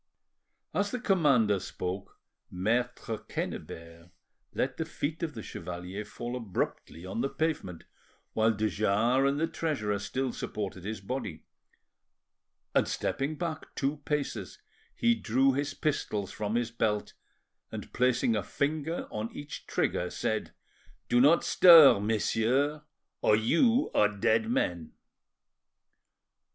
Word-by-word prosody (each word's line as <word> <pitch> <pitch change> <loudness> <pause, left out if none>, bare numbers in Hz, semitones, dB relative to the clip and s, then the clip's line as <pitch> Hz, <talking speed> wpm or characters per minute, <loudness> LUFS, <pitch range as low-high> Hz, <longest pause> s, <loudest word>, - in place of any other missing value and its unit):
As 205 0 +1
the 250 - -3
commander 140 - +3
spoke, 95 +1 -5 0.3
Maitre 115 +3 -1
Quennebert 85 +1 -6 0.4
let - - -2
the 160 - -2
feet 155 0 -4
of 160 -5 -3
the 110 - -6
chevalier 90 +4 -6
fall 120 +3 -6
abruptly 95 -6 -4
on 95 +5 -3
the 135 - 0
pavement, 150 - -2 0.5
while 110 0 +3
de 110 0 0
Jars 115 +6 +2
and 140 +1 -1
the 165 - +2
treasurer 130 -12 -2
still 130 +5 -2
supported 95 -3 -5
his 105 -2 -4
body, 100 -7 -5 1.3
and, - - +3
stepping 140 +3 -2
back 160 -1 -5
two 140 +2 -1
paces, 145 0 -3 0.4
he 235 -1 +3
drew 135 - +2
his 145 +1 -2
pistols 110 - -2
from 105 +1 -3
his 120 -1 0
belt, 105 -2 -1 0.6
and - - -7
placing 125 -2 +2
a 105 - +1
finger 155 - -2
on 110 +1 -4
each 145 +1 -8
trigger, - - 0
said— - - -2 0.6
"Do 120 0 +4
not 150 +6 +5
stir, 165 - +8
messieurs, 115 +7 +1 0.4
or 105 - +5
you 200 - +3
are 105 - +4
dead 110 +2 +1
men." 85 -8 -1
120 Hz, 125 wpm, -29 LUFS, 105-145 Hz, 1.3 s, stir